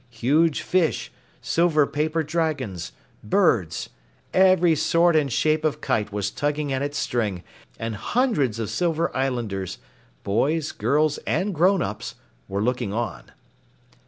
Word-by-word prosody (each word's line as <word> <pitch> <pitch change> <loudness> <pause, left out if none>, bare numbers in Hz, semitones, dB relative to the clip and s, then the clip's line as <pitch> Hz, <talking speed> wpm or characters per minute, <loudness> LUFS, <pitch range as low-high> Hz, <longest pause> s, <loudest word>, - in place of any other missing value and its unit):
Huge 145 +7 +1
fish, 180 -4 0 0.3
silver 165 -3 +3
paper 155 +3 -1
dragons, 150 - -2 0.3
birds 105 - +1 0.4
every 185 -3 +5
sort 170 +2 +3
and 145 -4 +2
shape 155 +5 +1
of 155 -2 0
kite 105 -1 -1
was 100 -1 -2
tugging 145 -1 -1
at 130 - -1
its 145 +1 -2
string, 105 -7 -1 0.3
and 115 0 -4
hundreds 170 - 0
of 115 -2 -3
Silver 170 -1 0
Islanders 120 -8 -2 0.5
boys, 145 +10 0
girls 150 +1 +1
and 195 +2 0
grown 180 +3 +3
ups - - -5 0.3
were 100 +1 -2
looking 125 -4 -1
on. 105 - -3
145 Hz, 130 wpm, -24 LUFS, 115-165 Hz, 0.5 s, every